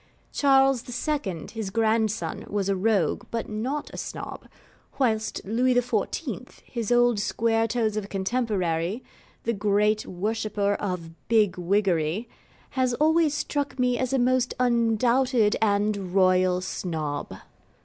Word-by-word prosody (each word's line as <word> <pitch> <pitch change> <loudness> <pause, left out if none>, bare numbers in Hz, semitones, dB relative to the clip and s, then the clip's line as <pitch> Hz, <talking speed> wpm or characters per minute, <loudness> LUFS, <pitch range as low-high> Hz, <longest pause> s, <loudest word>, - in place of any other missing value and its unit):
Charles 270 -3 +4 0.2
II., 205 - -2
his 220 -4 -4
grandson, 220 0 0
was 200 -1 -1
a 195 - +2
rogue, 195 -4 +1
but 230 -1 -3
not 250 +8 -3
a - - -7
Snob; - - -7 0.5
whilst 220 -5 0
Louis 245 +5 +2
XIV., 245 +2 -1
his 235 -2 -4
old 240 -1 +4
squaretoes 225 0 0
of 215 -2 -2
a - - -10
contemporary, 195 -2 -1 0.4
the 230 - 0
great 210 +1 +1
worshipper 205 +1 -1
of 180 -5 -4 0.2
Bigwiggery 190 -2 +1 0.4
has 255 -2 +1
always 310 +1 +3
struck 290 -1 -2
me 250 -1 +1
as 255 -1 -1
a 270 - +2
most 255 0 +2
undoubted 235 -1 +2
and 200 -3 0
Royal 185 -1 +4
Snob. 155 -6 -4
220 Hz, 120 wpm, -26 LUFS, 195-245 Hz, 0.5 s, Charles